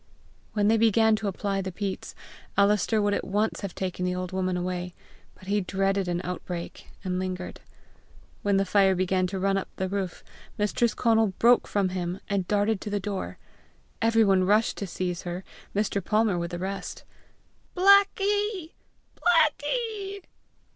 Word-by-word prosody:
When 205 -1 +2
they 225 +1 +4
began 220 0 +4
to 215 - -3
apply 195 0 -1
the 190 0 -4
peats, 195 +1 -5 0.4
Alister 205 +2 +3
would 205 -1 +2
at - - -1
once 210 +3 0
have 200 -3 -5
taken 185 -1 -3
the 180 0 0
old 180 0 -4
woman 185 -1 -1
away, 180 0 -3 0.4
but - - -16
he 205 +2 +1
dreaded 195 0 0
an 175 0 -1
outbreak, 180 -1 -6 0.2
and 185 -1 -1
lingered. 185 -1 -4 0.8
When 200 -1 +2
the 195 - +2
fire 195 0 +4
began 185 0 +1
to 190 +2 -4
run 195 +1 +1
up 195 - -3
the 190 - -2
roof, 190 -2 -3 0.3
Mistress 210 +2 +1
Conal 225 -4 +3
broke 240 +1 +5
from 200 -2 +1
him, 180 0 -3
and 195 -3 -1
darted 205 0 +1
to - - -5
the 205 0 -1
door. 195 0 -4 0.6
Every 225 0 +4
one 190 -2 +4
rushed 210 +4 +2
to 200 - -4
seize 180 0 -3
her, 175 +1 -5 0.3
Mr. 200 -1 0
Palmer 210 -2 +2
with 170 0 -3
the 175 - -5
rest. 195 +2 -5 0.7
"Blackie! 400 -1 +3 0.4
Blackie! 390 +5 +1
195 Hz, 160 wpm, -27 LUFS, 185-220 Hz, 0.8 s, broke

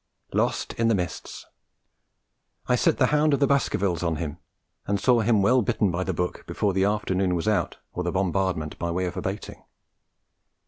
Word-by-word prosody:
Lost - - 0
in 115 - +3
the 115 - +3
mists. 90 -3 -5 1.2
I - - +2
set - - +2
The - - +4
Hound 150 -1 +4
of - - -4
the 140 - +4
Baskervilles 100 - +1
on 85 -2 0
him, 80 0 -5 0.5
and 100 0 +1
saw 120 +3 +4
him 110 -2 +3
well 125 +5 +4
bitten 110 -3 +1
by 85 +2 -1
the 95 - -2
book 90 0 -3
before 100 -2 0
the 95 +1 +2
afternoon 95 -3 0
was 85 +4 -2
out 105 -1 0 0.2
or 90 - -3
the 90 - -1
bombardment 95 -4 -1
by 85 - -2
way 90 +2 -1
of 90 - -4
abating. - - -5
95 Hz, 185 wpm, -25 LUFS, 90-110 Hz, 1.2 s, The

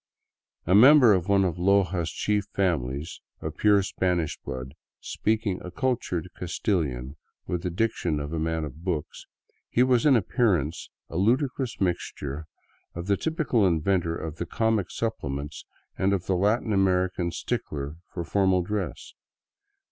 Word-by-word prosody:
A 90 - +2
member 125 +2 +8
of 90 -2 0
one 100 -1 +4
of 90 -2 -2
Loja's 90 -3 +2
chief 105 -1 0
families, 75 -6 -1 0.2
of - - -5
pure 105 -2 +4
Spanish 90 -4 -1
blood, 65 +1 -6 0.3
speaking 110 -3 -1
a 90 - -6
cultured 120 - -1
Castilian 75 - -2 0.3
with 90 -1 -2
the 90 - -2
diction 90 -5 -1
of 75 +2 -5
a 80 - -1
man 80 0 -1
of 75 +2 -8
books, 85 -6 -4 0.4
he 125 - +3
was 130 +1 +3
in 140 - +6
appearance 90 - +1 0.2
a 80 - -6
ludicrous 125 +5 0
mixture 80 -5 -3 0.5
of 85 0 -5
the 100 +1 +2
typical 150 - +1
inventor 85 0 +1
of 80 -1 -6
the 85 - -4
comic 110 -2 0
supplements 75 -10 -4 0.3
and 95 +1 +2
of 95 -2 -1
the 95 - +1
Latin 105 +4 +1
American 95 -2 +1
stickler 75 -2 -4
for 85 - -4
formal 95 0 +2
dress. 105 +2 -4
90 Hz, 145 wpm, -26 LUFS, 80-105 Hz, 0.5 s, member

